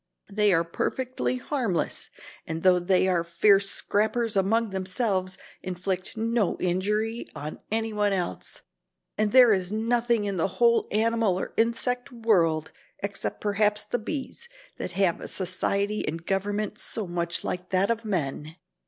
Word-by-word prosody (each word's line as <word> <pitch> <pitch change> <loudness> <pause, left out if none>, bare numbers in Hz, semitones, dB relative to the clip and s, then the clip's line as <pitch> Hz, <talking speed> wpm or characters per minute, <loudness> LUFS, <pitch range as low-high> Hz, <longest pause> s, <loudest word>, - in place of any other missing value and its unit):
They 210 0 +3
are 165 -2 +3
perfectly 255 +9 -2
harmless 250 - -2 0.4
and 160 0 -4
though 185 -1 +5
they 185 +1 +3
are 175 -3 +2
fierce 195 +4 +3
scrappers 220 +2 +1
among 215 +3 +2
themselves, 190 0 -1 0.2
inflict 185 +2 -3
no 225 -3 +1
injury 210 +6 -1
on 150 +1 -6
any 225 0 -1
one 205 -1 +2
else. 180 -3 -4 0.5
And 215 -1 +1
there 250 -3 +8
is 185 -1 -1
nothing 230 0 +1
in 200 -2 -2
the 165 - +2
whole 235 -1 +4
animal 220 -3 +2
or - - -5
insect 245 +3 0
world, 175 -10 +1 0.3
except 200 0 -3
perhaps 210 0 +2
the 240 +3 -2
bees, 295 - -6 0.3
that 180 - -5
have 185 -2 +1
a - - -6
society 200 +3 -1
and 165 +2 -4
government 205 +2 -1
so 220 - -4
much 170 -1 -3
like 180 0 -4
that 195 +3 +2
of 230 0 -2
men." 155 -6 -3
200 Hz, 145 wpm, -26 LUFS, 185-225 Hz, 0.5 s, there